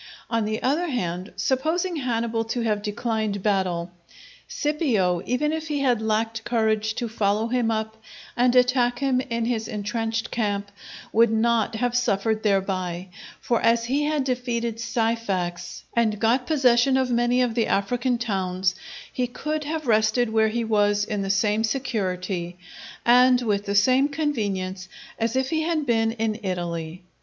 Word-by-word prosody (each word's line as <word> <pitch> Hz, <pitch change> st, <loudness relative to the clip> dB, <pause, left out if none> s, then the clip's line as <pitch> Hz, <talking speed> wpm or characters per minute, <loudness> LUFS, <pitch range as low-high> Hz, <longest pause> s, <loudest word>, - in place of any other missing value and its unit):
On 230 Hz, -2 st, +1 dB
the 215 Hz, +1 st, -3 dB
other 300 Hz, +7 st, +1 dB
hand, 185 Hz, -, -3 dB
supposing 320 Hz, +7 st, 0 dB
Hannibal 230 Hz, -4 st, -1 dB
to 235 Hz, +2 st, -2 dB
have 215 Hz, -3 st, 0 dB
declined 210 Hz, -1 st, -2 dB
battle, 185 Hz, -4 st, 0 dB, 0.6 s
Scipio, 230 Hz, -, 0 dB
even 300 Hz, +5 st, 0 dB
if 320 Hz, 0 st, -4 dB
he 295 Hz, -2 st, -1 dB
had 245 Hz, -5 st, +2 dB
lacked 220 Hz, +1 st, -1 dB
courage 220 Hz, -2 st, 0 dB
to 240 Hz, -, -2 dB
follow 215 Hz, 0 st, 0 dB
him 245 Hz, -2 st, +1 dB
up 220 Hz, 0 st, -2 dB, 0.4 s
and 245 Hz, +1 st, +3 dB
attack 250 Hz, -1 st, +3 dB
him 260 Hz, -1 st, +1 dB
in 235 Hz, -3 st, -2 dB
his 230 Hz, -2 st, -1 dB
intrenched 225 Hz, +1 st, -3 dB
camp, 205 Hz, -3 st, -2 dB, 0.4 s
would 230 Hz, +1 st, +5 dB
not 225 Hz, 0 st, +1 dB
have 245 Hz, +2 st, -1 dB
suffered 220 Hz, -2 st, +1 dB
thereby; 190 Hz, -3 st, -1 dB, 0.3 s
for 235 Hz, -, 0 dB
as 230 Hz, 0 st, +3 dB
he 280 Hz, +5 st, 0 dB
had 300 Hz, -2 st, 0 dB
defeated 240 Hz, -3 st, -2 dB
Syphax, 195 Hz, -7 st, -2 dB
and 225 Hz, -3 st, +2 dB
got 240 Hz, +4 st, +2 dB
possession 260 Hz, -3 st, +4 dB
of 260 Hz, -1 st, 0 dB
many 240 Hz, +1 st, +2 dB
of 240 Hz, -2 st, -1 dB
the 230 Hz, -1 st, +1 dB
African 240 Hz, +5 st, 0 dB
towns, 190 Hz, -5 st, -1 dB, 0.4 s
he 250 Hz, -1 st, -1 dB
could 305 Hz, +5 st, -4 dB
have 310 Hz, 0 st, -3 dB
rested 220 Hz, +1 st, +2 dB
where 220 Hz, 0 st, +3 dB
he 235 Hz, +2 st, -1 dB
was 205 Hz, -2 st, +2 dB
in 210 Hz, -1 st, -2 dB
the 195 Hz, -, -3 dB
same 210 Hz, +2 st, +2 dB
security 190 Hz, -8 st, -2 dB, 0.5 s
and 250 Hz, +1 st, +5 dB
with 205 Hz, -3 st, 0 dB
the 200 Hz, -, -2 dB
same 255 Hz, +7 st, +4 dB
convenience 200 Hz, -11 st, -2 dB, 0.3 s
as 230 Hz, +1 st, 0 dB
if 260 Hz, 0 st, 0 dB
he 315 Hz, -1 st, +1 dB
had 315 Hz, -2 st, 0 dB
been 225 Hz, -2 st, +2 dB
in 225 Hz, -1 st, -2 dB
Italy. 175 Hz, -2 st, -4 dB
225 Hz, 155 wpm, -24 LUFS, 205-250 Hz, 0.6 s, would